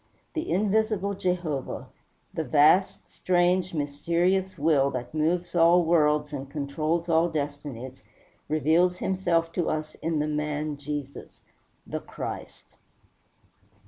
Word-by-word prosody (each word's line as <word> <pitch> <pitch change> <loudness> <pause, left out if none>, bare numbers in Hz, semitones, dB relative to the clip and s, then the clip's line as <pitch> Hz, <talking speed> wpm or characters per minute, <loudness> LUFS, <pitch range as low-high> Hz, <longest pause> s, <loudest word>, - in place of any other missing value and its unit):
The 320 +1 -3
Invisible 210 0 +1
Jehovah, 175 -7 -2 0.5
the 160 - -2
vast, 155 +7 +3
strange, 180 0 +1
mysterious 170 +6 0
Will 140 -2 +3
that 125 -1 -5
moves 170 +3 0
all 175 0 +5
worlds 150 -2 +2
and 135 -1 -5
controls 155 +4 -2
all 165 +1 +3
destinies, 145 -4 -5 0.5
reveals 160 +4 +3
himself 175 -3 0
to 170 0 -1
us 155 0 -3
in 165 -1 -1
the 150 - +1
Man 150 0 -2
Jesus 145 -1 -7 0.4
the - - -4
Christ. - - -7
160 Hz, 110 wpm, -26 LUFS, 150-180 Hz, 0.5 s, all